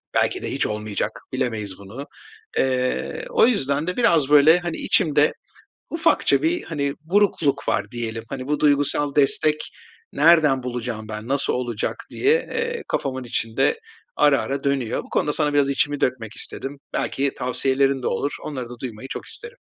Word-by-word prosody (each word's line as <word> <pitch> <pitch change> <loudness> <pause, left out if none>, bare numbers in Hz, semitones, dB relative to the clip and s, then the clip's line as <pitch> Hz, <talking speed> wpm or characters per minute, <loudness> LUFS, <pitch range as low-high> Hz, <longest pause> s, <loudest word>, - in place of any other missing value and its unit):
Belki - - +1
de - - -3
hiç - - 0
olmayacak, 105 -1 -3
bilemeyiz 110 -7 -2
bunu. 110 +8 -8 0.5
Eee, 130 - 0
o 475 - +5
yüzden 145 - +1
de 180 - -2
biraz, 165 - +3
böyle, 150 +4 +7
hani, 175 -2 -4
içimde 150 -6 +2 0.6
ufakça 330 0 +2
bir, 335 +2 0
hani, 140 -4 -2
burukluk 165 -6 +1
var - - -1
diyelim. 115 -2 -4
Hani, 130 -1 -5
"Bu 150 +1 0
duygusal 145 -1 +2
destek 150 +2 +2 0.4
nereden 155 -6 +5
bulacağım 120 -3 -4
ben, 110 +1 -6
nasıl 140 +1 0
olacak?" 120 -4 -2 0.2
diye, 415 +3 +3 0.2
eee, 470 0 -2
kafamın 130 -2 -2
içinde 120 - 0 0.4
ara 145 -2 +4
ara 135 0 -3
dönüyor. 140 -5 0
Bu - - -16
konuda 150 - 0
sana 150 -1 0
biraz 145 -1 +3
içimi 145 +1 0
dökmek 115 -4 -1
istedim. 140 +1 -6
Belki 140 0 -1
tavsiyelerin 135 +1 +1
de - - 0
olur. 140 +9 -1
Onları 130 -5 -5
da 120 -1 -10
duymayı 125 0 -7
çok - - -6
isterim. 485 +1 -9
140 Hz, 160 wpm, -23 LUFS, 125-155 Hz, 0.6 s, böyle